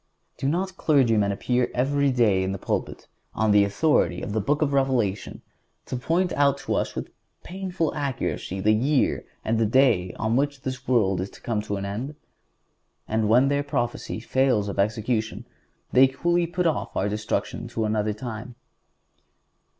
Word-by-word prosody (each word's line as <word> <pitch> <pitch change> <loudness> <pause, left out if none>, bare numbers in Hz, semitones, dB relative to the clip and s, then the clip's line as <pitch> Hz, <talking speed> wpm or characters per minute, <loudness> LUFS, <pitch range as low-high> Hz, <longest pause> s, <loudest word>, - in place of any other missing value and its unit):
Do 135 - 0
not 185 +3 -2
clergymen 115 -9 +3
appear 125 +5 0
every 140 +3 +2
day 110 -7 +3
in 95 +1 -1
the - - -3
pulpit, - - -3 0.3
and 110 - 0
on 110 - +3
the 105 0 +6
authority 100 - +1
of - - -4
the 110 - 0
Book 145 +9 +1
of 140 -2 -1
Revelation 125 -8 0 0.4
point 165 +8 0
out 140 -1 +3
to - - -1
us - - -1
with - - -5 0.3
painful 180 -3 -3
accuracy 135 - -3
the 105 +3 +3
year 130 +6 +1 0.2
and 110 0 +1
the 115 - +3
day 110 -7 +3
on 110 +2 -1
which 140 +1 0
this 130 0 -5
world 95 -7 +2
is 95 - -4
to - - -16
come 110 -3 -1
to 105 -1 -4
an 100 0 -4
end? 120 +9 -4 0.9
And 110 -1 0
when 125 +5 +5
their 140 +1 +1
prophecy 125 -6 -3
fails 125 -3 +1
of 100 - -5
execution 110 +2 -1 0.5
they 130 +1 +7
coolly 170 +6 0
put 180 +1 -2
off 165 - -1
our 95 - +1
destruction 105 +1 -3
to 110 - -2
another 105 0 0
time. 115 +2 -7
120 Hz, 170 wpm, -25 LUFS, 105-140 Hz, 0.9 s, they